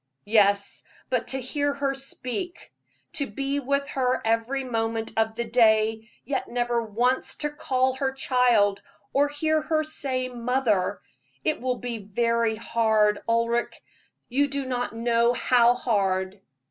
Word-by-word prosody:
"Yes; 200 -2 +2 0.3
but 250 -2 0
to 265 - -2
hear 285 +3 -1
her 275 -1 0
speak, 275 +6 -5 0.4
to 285 -3 -1
be 275 +6 -2
with 280 +1 -1
her 255 -1 0
every 230 +4 0
moment 225 -2 -2
of 220 0 +1
the 235 - -1
day, 220 -1 +3 0.2
yet 275 +3 -2
never 240 -1 0
once 240 +4 0
to 295 -1 -3
call 260 -3 0
her 265 0 -1
child, 245 -7 +2 0.3
or 285 +1 +4
hear 310 +2 0
her 310 0 0
say 265 -4 -2
'mother' 240 -5 0 0.4
it - - 0
will 250 0 -1
be 240 -2 -5
very 230 +2 0
hard, 220 -2 +2
Ulric 230 +1 0 0.5
you 280 +4 +2
do 280 -1 -3
not 250 -1 -2
know 235 +1 +2
how 245 -1 +4
hard." 195 -5 0
245 Hz, 140 wpm, -25 LUFS, 225-270 Hz, 0.5 s, or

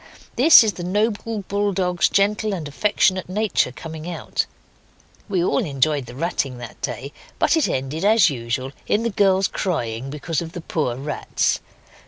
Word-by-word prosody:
This 275 +2 +8
is 215 -2 0
the 175 - -7
noble 210 +3 -1
bull 205 0 0
dog's 180 -2 +1
gentle 210 +1 +1
and 160 -5 -5
affectionate 185 +3 +1
nature 205 -8 +1
coming 160 +4 -8
out. 175 - -2 0.8
We 185 -4 +1
all 240 - +1
enjoyed 140 - 0
the 120 - -10
ratting 140 -4 -2
that 120 -2 -10
day, 140 +3 -5 0.2
but - - +3
it 320 - +2
ended, 135 +6 -3
as 215 -2 +5
usual, 130 -1 -3 0.2
in 215 - +1
the 235 - 0
girls 195 -1 +3
crying 125 - -3
because 150 +3 -3
of 165 0 -7
the 175 - -6
poor 150 -7 -2
rats. 140 +4 -1
175 Hz, 165 wpm, -22 LUFS, 140-205 Hz, 0.8 s, This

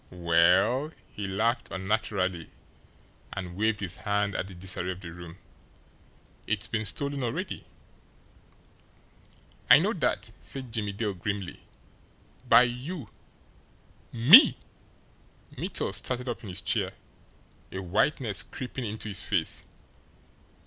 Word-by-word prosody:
"Well" 90 - +3 0.2
he 100 -1 -5
laughed 110 +6 0
unnaturally 95 -3 -2 0.8
and 90 -2 -6
waved 110 +1 0
his 95 -2 -5
hand 100 0 -1
at 95 - -3
the 95 - -11
disarray 90 0 -2
of 95 0 -5
the 85 -3 -8
room 85 0 -10 1.1
"it's 105 -1 0
been 110 -1 -2
stolen 140 +6 +1
already." 120 -2 -4 2.0
"I - - +10
know - - +1
that," - - -1
said 130 -3 -7
Jimmie 105 -3 -2
Dale 105 0 -2
grimly. 95 0 -4 0.9
"By 115 +2 +8
YOU!" 125 - -5 1.0
"Me!" 145 - +8 1.0
Mittel - - -2
started 125 0 -2
up 120 - -4
in 105 - -9
his 90 - -3
chair, - - 0 0.8
a - - -6
whiteness 105 - +1
creeping 130 -1 -6
into 110 0 -5
his 100 -2 +2
face. 90 -6 0
105 Hz, 115 wpm, -28 LUFS, 95-120 Hz, 2.0 s, I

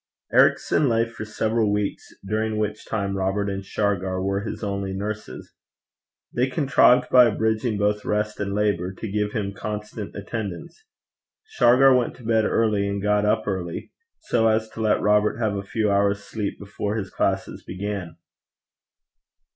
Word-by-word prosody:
Ericson 145 - +4
lay 115 0 +2
for 115 -2 -8
several 110 0 0
weeks, 105 -1 -2 0.2
during 110 +1 -1
which 105 0 -3
time 100 -3 -2
Robert 95 +2 0
and 100 0 -4
Shargar 95 -2 -1
were 100 +1 -1
his 105 - -6
only 100 -1 -2
nurses. 105 +2 -6 0.8
They 125 +2 +1
contrived, 135 -3 +4
by 125 -1 +8
abridging 110 0 0
both 105 0 0
rest 105 0 -1
and 100 -1 -2
labour, 95 -3 0
to 110 +1 -6
give 105 0 -1
him 100 -2 -2
constant 105 0 -6
attendance. 105 - -6 0.6
Shargar 135 - +5
went 125 -2 0
to 125 - -15
bed 110 -1 +2
early 105 -3 +1
and 100 0 -2
got 105 +1 +1
up 110 +1 +1
early, 90 -4 -4 0.3
so 115 -2 +2
as 110 0 +1
to 110 - -7
let 110 -1 +2
Robert 105 +1 +3
have 110 -3 0
a 100 - -2
few 105 +1 -1
hours' 100 0 +1
sleep 105 -1 -4
before 105 +1 -4
his 100 -4 -4
classes - - -1
began. 95 -3 -5
105 Hz, 155 wpm, -24 LUFS, 100-110 Hz, 0.8 s, by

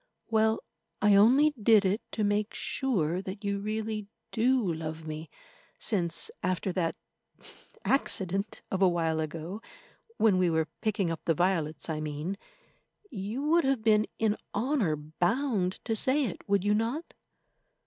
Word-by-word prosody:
Well, 220 0 +2 0.4
I 210 0 +4
only 260 +9 +6
did 210 -1 +5
it 195 +4 +1
to 215 - -1
make 205 +1 0
sure 185 - -1
that 195 +2 -7
you 200 0 -1
really 215 0 -3 0.2
do 235 -5 +2
love 160 0 -5
me, 155 0 -6 0.5
since, 175 -7 +1
after 185 +1 -1
that—accident 195 - -2
of 190 - -1
a 190 - +6
while 165 -2 0
ago 165 +6 -4 0.6
(when 200 -5 +4
we 180 -1 +3
were 160 -1 0
picking 205 -5 0
up 165 - -5
the 165 - +2
violets, 165 -4 0
I 160 -2 -2
mean), 155 +5 -3 0.8
you 215 +4 -4
would 330 +3 +3
have 265 -4 +1
been 215 -1 +4
in 220 -1 +1 0.2
honour 225 - +1
bound 180 - 0
to 225 - 0
say 265 +6 +2
it, 200 -2 -6
would 200 -2 +3
you 205 0 +3
not? 235 +10 -2
200 Hz, 145 wpm, -29 LUFS, 170-225 Hz, 0.8 s, only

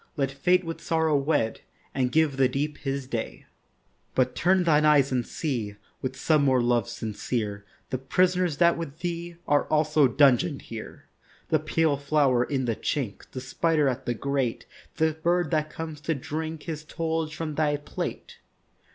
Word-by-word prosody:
Let 135 -2 0
Fate 180 +6 +2
with 165 -1 -6
Sorrow 160 -2 +1
wed 135 -5 +1 0.3
And 125 -2 0
give 155 -3 +2
the 130 -1 +4
Deep 145 +3 -2
his 135 -1 -3
day; 120 -3 -5 0.7
But 130 -1 +2
turn 185 +1 +3
thine 155 -3 +4
eyes 145 -3 +5
and 125 -2 +1
see 120 -10 -3 0.3
With 130 0 -3
some 155 +2 +3
more 130 -2 +4
love 120 -3 +1
sincere 105 -1 -3 0.3
The 130 - -1
prisoners 180 +3 +1
that 170 -1 +4
with 155 -3 -6
thee 170 0 -4
Are 145 0 +3
also 150 -2 +3
dungeon'd 140 +3 +3
here— 115 -2 -9 0.4
The 155 - +3
pale 155 -1 +1
flower 140 -3 +2
in 130 -1 -1
the 115 -2 0
chink, 115 -8 -3
The 130 - -6
spider 150 +3 +1
at 130 0 -2
the 120 - 0
grate, 135 -1 -1 0.3
The 160 0 +2
bird 170 +1 0
that 155 -1 +1
comes 160 -2 -7
to 160 +1 -1
drink 155 +3 -5
His 155 -2 -5
tollage 160 0 -2
from 160 -2 -4
thy 150 -1 +1
plate. 145 - -6
145 Hz, 170 wpm, -26 LUFS, 130-160 Hz, 0.7 s, eyes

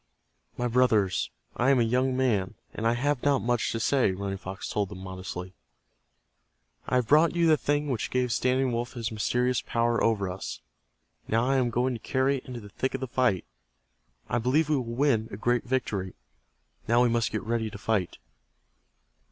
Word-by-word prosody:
"My 125 - 0
brothers, 115 -6 +2 0.3
I 125 - +2
am 135 -2 +5
a - - +4
young 125 +3 +1
man, 110 -8 +1 0.2
and 115 - -1
I 115 - +2
have 140 +1 0
not 140 -2 +2
much 120 0 0
to 115 - -2
say," 125 -4 +2
Running 95 0 -4
Fox 95 +1 -6
told 100 -2 -1
them, 100 - -8
modestly. 95 -1 -7 1.3
"I - - 0
have 125 -3 +2
brought 155 +4 +5
you 170 -1 +3
the 160 -1 +6
thing 145 0 0
which 125 -6 -2
gave 125 -1 0
Standing 130 +3 +1
Wolf 120 +1 -3
his 115 -2 -3
mysterious 125 +3 0
power 115 0 0
over 105 -4 +2
us. 90 +1 -5 0.7
Now 115 +2 +2
I 135 +1 +2
am 125 -2 +2
going 125 +3 0
to 115 - -5
carry 130 +4 +1
it 125 - -10
into 125 -2 -6
the 105 -2 -11
thick 130 +6 -2
of - - -3
the 130 - -2
fight. 120 -7 +1 0.8
I 120 - 0
believe 145 +6 +2
we 155 - +3
will 125 - -2
win 115 -2 +1
a 100 - -7
great 120 +2 +1
victory. 105 -7 -2 0.7
Now 120 +2 +4
we - - +4
must 115 -1 +1
get 110 - -3
ready 115 -1 -1
to 105 - -9
fight." 100 -3 -1
120 Hz, 195 wpm, -27 LUFS, 110-130 Hz, 1.3 s, the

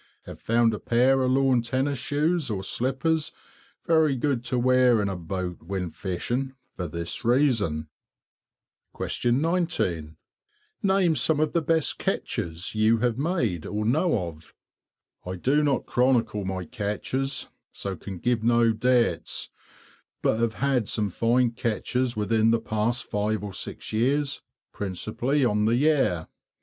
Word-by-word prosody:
Have - - -10
found 115 0 +3
a 105 - -4
pair 130 +3 +3
of 130 - +2
lawn 130 -2 +3
tennis 130 +3 -1
shoes 150 +2 0
or 95 -3 -3
slippers 135 +9 0 0.5
very 160 -4 +3
good 130 -2 -1
to 125 - -1
wear 125 -1 +4
in 100 - 0
a 95 - -2
boat 90 +1 -5
when 90 0 -4
fishing, 120 +11 -3 0.2
for 90 - -4
this 85 +7 -4
reason. 115 - +2 1.1
19. 120 - 0 0.6
Name 190 -4 +3
some 150 +3 +2
of 155 -1 +1
the 170 - +2
best 160 0 +1
catches 85 +1 -2
you 110 +1 +3
have 120 +1 0
made 130 - -1
or 105 +1 -2
know 125 - +2
of. 80 -2 -12 0.7
I 90 +1 -5
do 135 - +2
not 145 -3 +1
chronicle 120 -5 +1
my 95 -1 -3
catches, 130 - -2 0.2
so 100 -1 -5
can 95 +2 -8
give 120 +4 0
no 115 0 +4
dates; 120 -5 +1 0.7
but 110 - +2
have 115 -2 0
had 135 -6 0
some 105 -3 -1
fine 120 +4 +2
catches 120 +2 -1
within 110 +1 +2
the 115 0 +3
past 110 +2 -1
five 105 +1 -1
or 100 -2 -5
six - - -5
years, 140 +6 +1 0.3
principally 110 +8 -1
on 105 -2 +2
the 115 +2 +3
Yare. 130 - +2
120 Hz, 140 wpm, -26 LUFS, 105-135 Hz, 1.1 s, wear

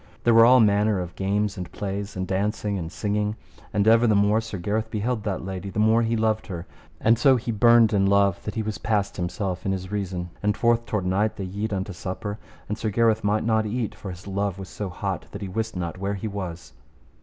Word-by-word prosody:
There 120 - +4
were 115 0 +8
all 130 +1 +7
manner 105 -2 +3
of 90 -1 -5
games 100 +1 -1
and 90 -2 -6
plays, 100 0 -4
of 95 - -1
dancing 100 +2 -1
and 80 -1 -5
singing. 105 0 -1 0.4
And 100 0 +1
ever 115 +1 +6
the 110 - +4
more 105 +2 +3
Sir 110 -3 -6
Gareth 105 +5 -2
beheld 110 +1 -2
that 95 -3 -2
lady, 95 0 -5
the 95 - -8
more 110 +2 +4
he 115 0 +1
loved 110 0 0
her; 90 -4 -6 0.3
and 115 +1 +3
so 135 +1 +6
he 120 -1 -2
burned 115 0 +5
in 100 -1 +3
love 100 -2 +3
that 105 - -4
he 110 - -1
was 110 -1 -4
past 105 -3 -1
himself 90 +1 -3
in 95 - 0
his 95 0 -4
reason; 90 -4 -3
and 105 -1 +1
forth 115 0 +2
toward 105 -3 -1
night 105 +4 +1
they 100 - -5
yede 100 +4 -3
unto 100 0 -3
supper, 100 +4 -5 0.3
and 105 +1 -4
Sir 110 - -1
Gareth 110 +1 +2
might 105 +1 +1
not 110 -1 +1
eat, 115 +1 -2
for 100 - -8
his 90 0 -9
love 100 -1 -2
was 95 -2 -8
so 105 +1 -5
hot 95 +1 -4
that 100 - -6
he - - -3
wist 110 +3 -3
not 90 0 -4
where 100 +1 -2
he 100 +3 -4
was. 85 -8 -6
105 Hz, 235 wpm, -25 LUFS, 95-110 Hz, 0.4 s, were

